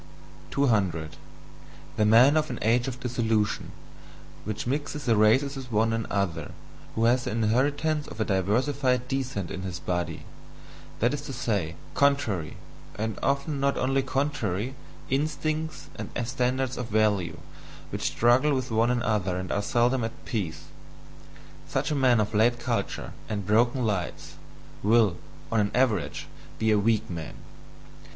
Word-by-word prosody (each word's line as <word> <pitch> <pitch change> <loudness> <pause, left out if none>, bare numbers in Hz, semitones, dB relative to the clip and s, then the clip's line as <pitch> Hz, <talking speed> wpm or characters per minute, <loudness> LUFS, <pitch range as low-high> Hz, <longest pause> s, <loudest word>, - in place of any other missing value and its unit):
200. 95 - +1 0.8
The 105 - +2
man 120 +7 +7
of 155 -1 +2
an 125 - -4
age 120 +3 +3
of 125 -1 -4
dissolution 115 -4 0 0.7
which 105 -1 -3
mixes 145 +3 -2
the 115 - +4
races 130 +7 +4
with 130 -2 -8
one 110 +1 +2
another, 100 -8 -2 0.4
who 115 - +2
has 125 +1 +3
the - - -1
inheritance 145 +7 +1
of - - -10
a 110 - +1
diversified 125 +6 +1
descent 130 -9 -2
in 95 - -4
his 95 -2 -4
body 85 -3 -3 0.7
that 120 +5 +2
is 145 - -3
to 140 -2 -7
say, 105 -10 -1 0.2
contrary, 130 - +1 0.4
and 110 0 -3
often 140 +2 0
not 140 0 +1
only 135 +1 +2
contrary, 130 -5 -1 0.4
instincts 155 +2 -1
and - - -5 0.2
standards 130 0 0
of 125 - -3
value, 105 -5 +1 0.5
which - - -4
struggle 130 +5 +3
with 130 -2 -3
one 115 +2 +3
another 105 -7 0
and 90 -1 -4
are 100 - +1
seldom 120 +3 +2
at 115 +1 -6
peace 85 -10 -3 1.0
such - - -1
a - - +1
man 130 -4 +4
of 105 +1 0
late 115 +3 +4
culture 120 - -3 0.2
and 100 -3 -3
broken 120 +4 +3
lights, 100 -5 -3 0.5
will, 105 -4 +4 0.3
on 115 - +2
an 100 -1 +2
average, 125 -7 +1 0.3
be 110 0 +2
a 105 - +4
weak 110 +1 +1
man. 85 -3 -6
120 Hz, 145 wpm, -27 LUFS, 105-135 Hz, 1.0 s, man